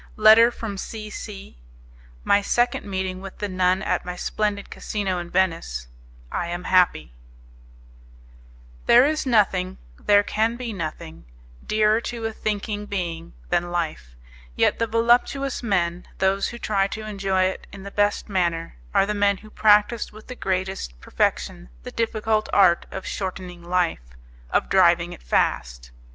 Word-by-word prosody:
Letter 220 +2 +7
From 215 -5 -6
C. 215 0 -6
C. 195 - -9 0.6
My 200 - +4
Second 240 +1 0
Meeting 190 -1 -3
With 195 -1 -9
the 205 - -3
Nun 185 0 +1
At - - 0
My 180 0 -5
Splendid 205 +2 -2
Casino 195 -4 -2
In 175 0 -7
Venice 165 - -1 0.4
I 170 - -2
Am 175 +1 -4
Happy 180 - +2 1.7
There 245 +2 +7
is 305 -1 0
nothing, 195 -6 +2 0.2
there 205 0 +4
can 220 +3 0
be 240 -2 -5
nothing, 160 - -6 0.4
dearer 215 +1 +2
to 235 -1 -5
a 225 - -2
thinking 210 -1 -3
being 170 -4 -4 0.2
than 175 0 0
life; 155 - -3 0.4
yet - - +2
the 230 - +1
voluptuous 240 +4 +2
men, 180 -6 -1
those 190 +1 +1
who 235 - -7
try 200 -4 +1
to 215 +2 -6
enjoy 195 -3 0
it 185 0 -2
in 195 -1 -10
the 200 - -8
best 205 0 +1
manner, 170 - -1 0.2
are - - +5
the 210 - -1
men 205 -1 +2
who 215 +2 -15
practise 210 +2 +3
with 215 +1 -13
the 250 - -7
greatest 185 - -3
perfection - - -1
the - - -7
difficult 220 -1 0
art 185 -4 +4
of 190 - -7
shortening 185 -2 -5
life, 175 - 0 0.5
of - - +1
driving - - +4
it - - -12
fast. - - -1
195 Hz, 150 wpm, -23 LUFS, 180-215 Hz, 1.7 s, Letter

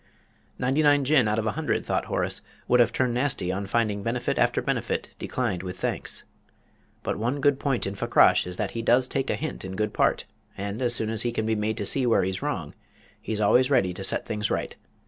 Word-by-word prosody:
"Ninety 135 +4 +1
nine 145 -1 +4
Jinn 135 -4 +4
out 105 0 0
of 110 - -1
a 110 - +1
hundred," 155 +3 -2
thought - - -1
Horace, - - -1 0.3
"would 125 - +4
have 120 - +5
turned 125 -2 0
nasty 125 -8 0
on 95 +1 -3
finding 105 -2 0
benefit 115 +4 -1
after - - +2
benefit - - -2
'declined 110 -9 -2
with 90 -1 -6
thanks.' - - -2 0.8
But - - -2
one 120 +6 -1
good 140 0 +2
point 135 -4 0
in 100 - -3
Fakrash 100 - +4
is 90 0 -6
that - - -2
he 115 - -4
does 125 +2 +3
take 135 +1 -2
a - - +1
hint 155 - -5
in 95 0 -6
good 105 +2 -1
part, - - +1 0.3
and, 100 +4 -4
as 120 -1 +2
soon 110 -1 -1
as 110 - -2
he 120 - 0
can 110 -1 -2
be 110 - +1
made 110 0 -1
to 100 - -2
see 130 +4 +2
where 115 - +3
he's 95 0 -2
wrong, - - -3 0.5
he's 110 -1 -3
always 125 +5 +4
ready 120 -10 +2
to 95 - -7
set - - 0
things 105 -1 -2
right. - - -2
115 Hz, 225 wpm, -26 LUFS, 100-130 Hz, 0.8 s, have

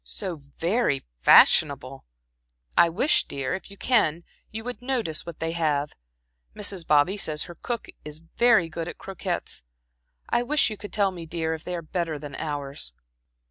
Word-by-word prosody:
"So 190 -5 -4
very 150 - -1 0.2
fashionable! 135 - +5 0.7
I 170 - +6
wish, 230 - +2
dear, 135 -1 -3
if 190 - -5
you 200 - -12
can, 175 -11 +2 0.3
you 220 +1 -6
would 245 +1 -5
notice 235 -12 -2
what 170 - -8
they 165 0 -1
have. 150 -3 0 0.6
Mrs. 195 -5 -1
Bobby 150 +7 +4
says 155 -5 0
her 175 - -9
cook 235 +7 -4 0.2
is 150 0 -7
very 180 +3 +3
good 165 +1 -5
at - - -7
croquettes. 190 - -3 0.7
I - - +2
wish 275 0 +2
you - - -4
could 205 0 -9
tell 200 -2 +2
me, 170 -3 -8
dear, 160 0 -2
if 160 0 -6
they 180 - -4
are 170 - -5
better 165 -1 -2
than 145 -1 -8
ours." 140 - -4
170 Hz, 170 wpm, -26 LUFS, 150-200 Hz, 0.7 s, I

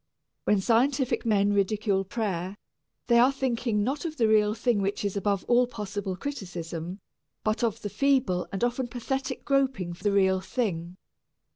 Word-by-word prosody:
When 210 - +3
scientific 250 +3 +2
men 205 -2 +3
ridicule 200 0 +1
prayer, 195 -2 -3 0.5
they 235 -1 +4
are 250 +3 +6
thinking 235 -5 0
not 270 +6 -2
of 315 -2 -4
the 225 - +3
real 215 -1 +3
thing 230 -3 +1
which 200 +1 -1
is 200 - -1
above 200 -1 0
all 245 0 +4
possible 205 -4 -4
criticism, 180 - -5 0.4
but 215 +2 0
of 225 -1 -1
the 205 - -2
feeble 265 -10 +1
and 195 - -3
often 245 +1 0
pathetic 260 +3 -4
groping 265 -11 +1
for 170 - -14
the 205 - +2
real 190 -1 +3
thing. 185 -4 -3
210 Hz, 160 wpm, -27 LUFS, 195-245 Hz, 0.5 s, are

